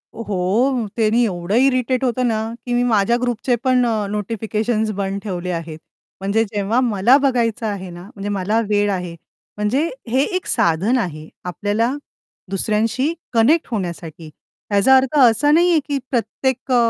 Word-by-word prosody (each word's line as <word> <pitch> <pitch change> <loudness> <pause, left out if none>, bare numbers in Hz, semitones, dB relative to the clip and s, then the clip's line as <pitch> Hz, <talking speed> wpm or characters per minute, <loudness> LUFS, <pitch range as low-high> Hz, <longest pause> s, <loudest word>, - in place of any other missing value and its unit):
हो, 225 +4 0
त्यांनी 225 +1 +2
एवढं 185 -2 -2
इरिटेट 255 0 +2
होतं 250 0 +1
ना, 220 -1 0 0.2
की 245 - -2
मी 245 0 +2
माझ्या 235 -1 +2
ग्रुपचे 245 0 0
पण 255 -1 +3
अ, 220 -3 0
नोटिफिकेशन्स 215 +1 -2
बंद 200 -1 -3
ठेवले 180 -3 -4
आहेत. 165 -2 -5 0.4
म्हणजे 200 +3 +1
जेव्हा 210 +2 -1
मला 225 +5 +4
बघायचं 240 -5 0
आहे 200 -3 -4
ना, 175 0 -10
म्हणजे 200 0 -5
मला 205 +3 0
वेळ 205 0 +2
आहे, 180 -3 -4 0.4
म्हणजे 255 +10 0 0.2
हे 260 +4 +2
एक 370 - -2
साधन 180 +10 +2
आहे 155 -8 -4 0.2
आपल्याला 205 +6 -1 0.6
दुसऱ्यांशी 225 - 0 0.2
कनेक्ट 260 +9 +3
होण्यासाठी. 170 -6 -5 0.4
ह्याचा 205 +6 +5
अर्थ 265 +2 0
असा 250 +3 +5
नाहीये 340 +1 +4
की 285 -2 -1
प्रत्येक 255 +2 -2
अ, - - +4
220 Hz, 150 wpm, -20 LUFS, 195-250 Hz, 0.6 s, ह्याचा